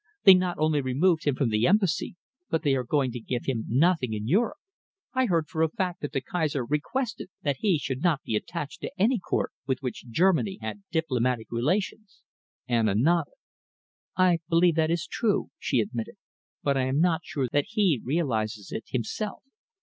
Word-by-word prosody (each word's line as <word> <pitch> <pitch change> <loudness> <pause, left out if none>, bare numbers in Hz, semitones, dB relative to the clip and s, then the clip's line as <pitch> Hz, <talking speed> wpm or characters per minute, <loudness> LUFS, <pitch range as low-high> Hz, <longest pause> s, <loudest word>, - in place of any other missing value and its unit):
They 195 - +10
not 180 -1 +1
only 155 -1 +2
removed 155 +6 +2
him 145 -3 +2
from 135 -4 +1
the 110 +2 +2
Embassy, 195 -4 +1 0.3
but 160 - 0
they 145 -3 +3
are 130 -1 0
going 130 0 +1
to 120 - -5
give 120 +1 -4
him 120 -5 -1
nothing 140 -2 +2
in 105 0 -3
Europe. 225 - +2 0.6
I 260 -1 +2
heard 165 -5 +1
for 160 +1 -3
a 160 - +3
fact 180 +1 -3
that 145 - -4
the 135 - -1
Kaiser 145 -3 -1
requested 185 - -2
that 145 -3 0
he 195 -6 +3
should 135 -2 -4
not 165 -5 +1
be 110 - -2
attached 150 +6 -4
to - - -4
any 230 +4 +3
Court 175 - -1 0.2
with 130 -2 +1
which 125 -2 -5
Germany 190 - +2
had 205 - -6
diplomatic 125 -8 0
relations." 185 - -2 0.4
Anna 115 -5 +2
nodded. 160 +7 +2 0.8
"I 180 -2 +4
believe 170 +1 +4
that 160 0 +1
it - - +2
is 170 -1 -2
true," 210 +3 0
she 130 - +1
admitted, 110 +2 -4 0.5
"but 140 - +2
I 130 -1 +1
am 130 +3 0
not 170 -1 +3
sure 135 -4 -2
that 145 -1 +2
he 195 - +2
realises 115 - -1
it 110 - -5
himself. 130 - -3
150 Hz, 190 wpm, -27 LUFS, 125-180 Hz, 0.8 s, They